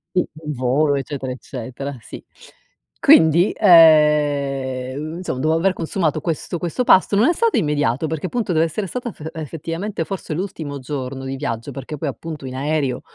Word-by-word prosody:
Il 180 Hz, -, +2 dB, 0.3 s
volo, 135 Hz, +4 st, +1 dB
eccetera, 135 Hz, -1 st, -4 dB
eccetera, 130 Hz, +2 st, -7 dB
sì. -, -, -10 dB, 0.8 s
Quindi, 165 Hz, +4 st, +5 dB
ehm, 150 Hz, -5 st, +4 dB
insom 175 Hz, -8 st, -4 dB
dopo 155 Hz, +4 st, +1 dB
aver 185 Hz, +3 st, +2 dB
consumato 160 Hz, -3 st, -1 dB
questo 165 Hz, +2 st, -3 dB
questo 175 Hz, +9 st, -2 dB
pasto, 195 Hz, -3 st, +4 dB
non 215 Hz, +6 st, +4 dB
è -, -, +3 dB
stato 460 Hz, +5 st, +1 dB
immediato 145 Hz, -3 st, 0 dB
perché 160 Hz, +3 st, -3 dB
appunto 230 Hz, -2 st, -2 dB
deve 160 Hz, 0 st, +3 dB
essere 170 Hz, +6 st, -3 dB
stata 245 Hz, +3 st, -5 dB
fe 160 Hz, -4 st, -8 dB
effettivamente 165 Hz, +4 st, -4 dB
forse 190 Hz, -4 st, -5 dB
l'ultimo 160 Hz, -5 st, -5 dB
giorno 135 Hz, 0 st, -5 dB
di 135 Hz, 0 st, -4 dB
viaggio, 115 Hz, -1 st, -4 dB
perché 135 Hz, +3 st, -7 dB
poi 145 Hz, +1 st, -2 dB
appunto 155 Hz, 0 st, -7 dB
in 130 Hz, -, -6 dB
aereo 140 Hz, -2 st, -1 dB
150 Hz, 160 wpm, -20 LUFS, 135-170 Hz, 0.8 s, Quindi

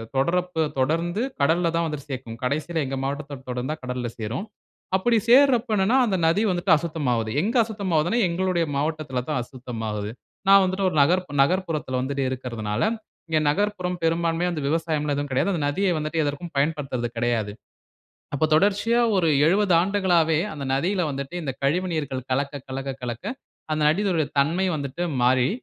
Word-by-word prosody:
தொட்ரப்ப 170 Hz, +3 st, +1 dB
தொடர்ந்து 165 Hz, -, 0 dB, 0.2 s
கடல்ல 170 Hz, +4 st, +3 dB
தான் 165 Hz, 0 st, +1 dB
வந்துட்டு 150 Hz, -1 st, -6 dB
சேக்கும். 120 Hz, -3 st, -6 dB
கடைசியில 155 Hz, +4 st, -1 dB
எங்க 135 Hz, 0 st, -3 dB
மாவட்டத்த 140 Hz, -1 st, -5 dB
தொடர்ந்தா 125 Hz, +5 st, -3 dB
கடல்ல 125 Hz, -1 st, -3 dB
சேரும். 115 Hz, -, -3 dB, 0.5 s
அப்பிடி 230 Hz, +4 st, +2 dB
சேர்றப்ப 250 Hz, -3 st, +5 dB
என்னனா, 195 Hz, +7 st, +3 dB
அந்த 200 Hz, -4 st, 0 dB
நதி 170 Hz, +6 st, +3 dB
வந்துட்டு 175 Hz, -2 st, +2 dB
அசுத்தமாவுது. 130 Hz, -9 st, -1 dB
எங்க 225 Hz, +8 st, -1 dB
அசுத்தமாவுதுன்னா, 200 Hz, -2 st, 0 dB
எங்களுடைய 175 Hz, -1 st, 0 dB
மாவட்டத்தில 145 Hz, -4 st, -2 dB
தான் 150 Hz, -, 0 dB
அசுத்தமாகுது. 115 Hz, -5 st, -5 dB, 0.4 s
நான் 195 Hz, 0 st, +8 dB
வந்துட்டு, 190 Hz, +1 st, 0 dB
1 155 Hz, -, -3 dB
நகர்ப் 180 Hz, +1 st, +1 dB
நகர்ப்புறத்தில 155 Hz, -6 st, -1 dB
வந்துட்டு 135 Hz, +1 st, -1 dB
இருக்கிறதுனால, 115 Hz, -4 st, -3 dB, 0.5 s
இங்க 155 Hz, -1 st, +2 dB
நகர்ப்புற 205 Hz, +2 st, 0 dB, 0.2 s
பெரும்பான்மையா 165 Hz, +1 st, +1 dB
அந்த 155 Hz, -, -3 dB
விவசாயம்லாம் 155 Hz, -2 st, 0 dB
எதுவும் 145 Hz, -1 st, -3 dB
கிடையாது. 135 Hz, +10 st, +1 dB
அந்த 165 Hz, -5 st, -1 dB
நதிய 190 Hz, +6 st, 0 dB
வந்துட்டு, 155 Hz, +1 st, -1 dB
எதற்கும் 145 Hz, +4 st, -4 dB
பயன்படுத்துறது 140 Hz, -5 st, -1 dB
கிடையாது. 115 Hz, -3 st, 0 dB, 0.8 s
அப்ப 150 Hz, -, +1 dB
தொடர்ச்சியா, 205 Hz, +7 st, +3 dB, 0.2 s
1 175 Hz, -3 st, +2 dB, 0.2 s
70 195 Hz, +2 st, +3 dB
ஆண்டுகளாவே 175 Hz, -5 st, +2 dB
அந்த 140 Hz, -2 st, -6 dB
நதியில 180 Hz, +6 st, 0 dB
வந்துட்டு, 140 Hz, +4 st, -5 dB
இந்த 135 Hz, -3 st, -3 dB
கழிவுநீர்கள் 150 Hz, -4 st, -1 dB
கலக்க, 140 Hz, +2 st, -1 dB
கலக்க, 135 Hz, +1 st, -4 dB
கலக்க, 120 Hz, +6 st, -5 dB, 0.5 s
அந்த 155 Hz, -, 0 dB
நதியினுடைய 170 Hz, -2 st, +1 dB
தன்மை 165 Hz, +7 st, +2 dB
வந்துட்டு 140 Hz, +4 st, -4 dB, 0.2 s
மாறி, 125 Hz, 0 st, +4 dB
155 Hz, 150 wpm, -24 LUFS, 135-180 Hz, 0.8 s, நான்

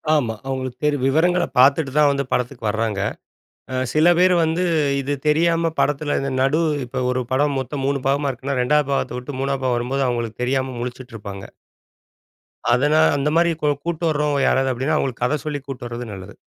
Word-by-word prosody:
ஆமா. 120 Hz, -7 st, 0 dB
அவர்களுக்கு 130 Hz, -2 st, -4 dB
தெரியும். 145 Hz, -3 st, +1 dB
விவரங்கள 175 Hz, +6 st, +2 dB, 0.2 s
பார்த்துட்டு 140 Hz, +2 st, +4 dB
தான், 150 Hz, -1 st, +6 dB
வந்து 140 Hz, 0 st, -1 dB
படத்துக்கு 125 Hz, 0 st, -2 dB
வராங்க. 110 Hz, -2 st, -2 dB, 0.7 s
அ -, -, -1 dB, 0.2 s
சில 155 Hz, +2 st, +3 dB
பேர் 180 Hz, 0 st, +5 dB
வந்து 165 Hz, +3 st, 0 dB, 0.4 s
இது 140 Hz, +1 st, -2 dB
தெரியாம, 165 Hz, +2 st, +2 dB
படத்துல 145 Hz, 0 st, 0 dB
இந்த 135 Hz, 0 st, -2 dB
நடு 135 Hz, +5 st, +2 dB, 0.2 s
இப்ப 130 Hz, +1 st, -4 dB
ஒரு 125 Hz, 0 st, 0 dB
படம் 140 Hz, +1 st, +1 dB
மொத்தம் 135 Hz, +1 st, -4 dB
3 140 Hz, 0 st, 0 dB
பாகமா 140 Hz, +1 st, +1 dB
இருக்குனா, 130 Hz, +1 st, -4 dB
2வது 150 Hz, +2 st, +2 dB
பாகத்த 130 Hz, -2 st, -1 dB
விட்டு, 130 Hz, +2 st, -7 dB
3வது 135 Hz, 0 st, -1 dB
பாகம் 125 Hz, -1 st, +1 dB
வரும்போது 135 Hz, +3 st, -1 dB
அவங்களுக்கு 120 Hz, -1 st, -3 dB
தெரியாம 130 Hz, 0 st, -1 dB
முழிச்சுட்டு 125 Hz, 0 st, -7 dB
இருப்பாங்க. 100 Hz, -2 st, -8 dB, 1.3 s
அதனா 145 Hz, +5 st, +3 dB, 0.2 s
அந்த 145 Hz, +1 st, 0 dB
மாதிரி 170 Hz, +1 st, +4 dB
கு 150 Hz, -, +1 dB, 0.2 s
கூட்டிட்டு 170 Hz, -1 st, -1 dB
வர்றவங்க 150 Hz, -2 st, 0 dB
யாராவது 135 Hz, 0 st, +2 dB
அப்படின்னா, 135 Hz, +6 st, -1 dB
அவங்களுக்கு 130 Hz, -4 st, -2 dB
கத 145 Hz, +5 st, +1 dB
சொல்லி 150 Hz, -1 st, -2 dB
கூட்டிட்டு 125 Hz, -3 st, -6 dB
வர்றது 120 Hz, -1 st, -6 dB
நல்லது. 95 Hz, +1 st, -10 dB
135 Hz, 180 wpm, -21 LUFS, 125-150 Hz, 1.3 s, தான்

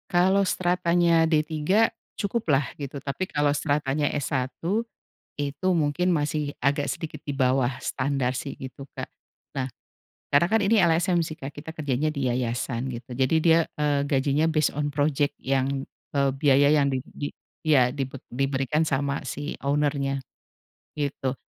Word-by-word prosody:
Kalau 185 Hz, +3 st, +4 dB
stratanya 170 Hz, -2 st, +3 dB
D3 155 Hz, +7 st, +2 dB, 0.3 s
cukuplah 180 Hz, -, 0 dB
gitu, 140 Hz, 0 st, -5 dB
tapi 165 Hz, +7 st, -3 dB
kalau 145 Hz, -1 st, +2 dB
stratanya 145 Hz, -1 st, 0 dB
S1 130 Hz, -3 st, -1 dB, 0.9 s
itu 145 Hz, +5 st, -2 dB
mungkin 170 Hz, +3 st, +2 dB
masih 150 Hz, -1 st, -1 dB
agak 140 Hz, +1 st, +2 dB
sedikit 155 Hz, -2 st, -4 dB
di 145 Hz, -, -2 dB
bawah 130 Hz, -2 st, +2 dB
standar 130 Hz, -1 st, -1 dB
sih 140 Hz, -, -5 dB
itu, 135 Hz, +1 st, -9 dB
Kak. -, -, -5 dB, 0.5 s
Nah, 130 Hz, -, 0 dB, 0.7 s
karena 145 Hz, +4 st, +5 dB
kan 220 Hz, +2 st, +3 dB
ini 220 Hz, +4 st, +4 dB
LSM 175 Hz, +1 st, +3 dB
sih, 160 Hz, -1 st, -3 dB
Kak, 135 Hz, 0 st, -7 dB
kita 160 Hz, +3 st, -9 dB
kerjanya 145 Hz, -1 st, 0 dB
di 140 Hz, -4 st, -1 dB
yayasan 120 Hz, +1 st, -2 dB
gitu 120 Hz, -1 st, -7 dB
jadi 130 Hz, +4 st, +1 dB
dia, 165 Hz, 0 st, +6 dB, 0.2 s
eee, 145 Hz, -1 st, +1 dB
gajinya 140 Hz, +3 st, +2 dB
based 155 Hz, -2 st, +2 dB
on 145 Hz, 0 st, 0 dB
project 145 Hz, 0 st, +1 dB
yang, 135 Hz, 0 st, 0 dB, 0.3 s
eee, 140 Hz, -1 st, +3 dB
biaya 140 Hz, 0 st, +5 dB
yang 145 Hz, -2 st, +4 dB
di 130 Hz, -2 st, -1 dB
di 145 Hz, -, -5 dB, 0.3 s
iya 135 Hz, -6 st, +4 dB
dibe 135 Hz, -1 st, -4 dB, 0.2 s
diberikan 135 Hz, +4 st, 0 dB
sama 140 Hz, 0 st, 0 dB
si 145 Hz, +1 st, -4 dB
owner-nya, 140 Hz, -1 st, 0 dB, 0.8 s
gitu. 140 Hz, -3 st, -2 dB
145 Hz, 145 wpm, -26 LUFS, 135-155 Hz, 0.9 s, dia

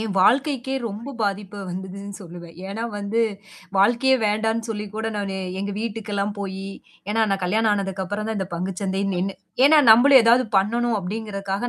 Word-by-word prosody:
என் 220 Hz, -3 st, -3 dB
வாழ்க்கைக்கே 265 Hz, +4 st, +2 dB
ரொம்ப 230 Hz, +7 st, -7 dB
பாதிப்பு 205 Hz, 0 st, -2 dB
வந்ததுன்னு 190 Hz, +2 st, -7 dB
சொல்லுவேன். 170 Hz, -1 st, -11 dB
ஏன்னா 220 Hz, +4 st, -4 dB
வந்து, 205 Hz, +3 st, 0 dB, 0.6 s
வாழ்க்கையே 240 Hz, +6 st, +4 dB
வேண்டான்னு 220 Hz, +2 st, 0 dB
சொல்லி 210 Hz, -1 st, -4 dB
கூட 220 Hz, +1 st, -2 dB
நான் 200 Hz, -1 st, -3 dB, 0.3 s
எங்க 200 Hz, 0 st, -3 dB
வீட்டுக்கெல்லாம் 210 Hz, -2 st, -3 dB
போயி, 195 Hz, 0 st, -5 dB, 0.4 s
ஏன்னா 225 Hz, +1 st, +2 dB
நான் 195 Hz, -1 st, -1 dB
கல்யாணம் 215 Hz, +4 st, +2 dB
ஆனதுக்கு 195 Hz, -2 st, -2 dB
அப்புறம் 205 Hz, +3 st, -4 dB
தான் 220 Hz, -2 st, -2 dB
இந்த 190 Hz, -, -3 dB
பங்கு 180 Hz, +2 st, -3 dB
சந்தைன்னு 195 Hz, 0 st, -1 dB
நின்னு 190 Hz, +2 st, -2 dB, 0.3 s
ஏன்னா 305 Hz, +1 st, +6 dB
நம்மளும் 260 Hz, +4 st, +8 dB
ஏதாவது 240 Hz, +2 st, +5 dB
பண்ணணும் 230 Hz, +4 st, +2 dB
அப்படிங்கறக்காக 200 Hz, +2 st, -3 dB
205 Hz, 160 wpm, -23 LUFS, 195-225 Hz, 0.6 s, நம்மளும்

